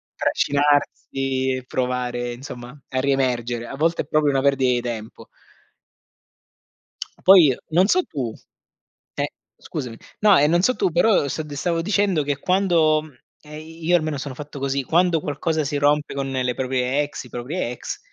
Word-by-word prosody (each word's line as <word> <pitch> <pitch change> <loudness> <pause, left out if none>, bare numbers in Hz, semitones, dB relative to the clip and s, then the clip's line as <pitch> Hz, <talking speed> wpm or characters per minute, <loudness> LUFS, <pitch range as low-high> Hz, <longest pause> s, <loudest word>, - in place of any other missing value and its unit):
trascinarsi 135 -2 0
e 130 - -6
provare 125 -1 -2
insomma 125 +1 -10
a 130 - -1
riemergere, 125 -3 0
a 135 - -7
volte 165 +4 +1
è - - -19
proprio 150 -1 +2
una 135 - +1
perdita 135 -2 +3
di 120 - 0
tempo. 115 -2 -7 2.0
Poi 180 -8 +8 0.2
non 180 +5 +4
so 365 +7 +3
tu 130 - -4 0.8
eh - - -1 0.3
scusami. 115 -3 -6 0.2
No, 210 -2 +6
ehm, 150 +2 +4
non 175 +1 +3
so 255 +6 +2
tu 190 - +1
però 175 -2 +3
st 155 +3 -4
ti 145 -1 -8
stavo 165 +3 -1
dicendo 195 -4 +1
che 145 0 -2
quando 170 -4 +2 0.4
ehm, 150 0 -10 0.2
io 175 +2 +3
almeno 155 -3 -2
sono 140 0 -5
fatto 145 +1 -8
così, 135 0 -1
quando 170 +3 +2
qualcosa 155 +2 -1
si 145 +1 -3
rompe 145 +1 +1
con 135 -1 -3
le 125 -1 -1
proprie 130 +1 0
ex, 145 - -7
i - - -13
propri 125 +9 -5
ex, 125 - -6
145 Hz, 160 wpm, -22 LUFS, 130-160 Hz, 2.0 s, Poi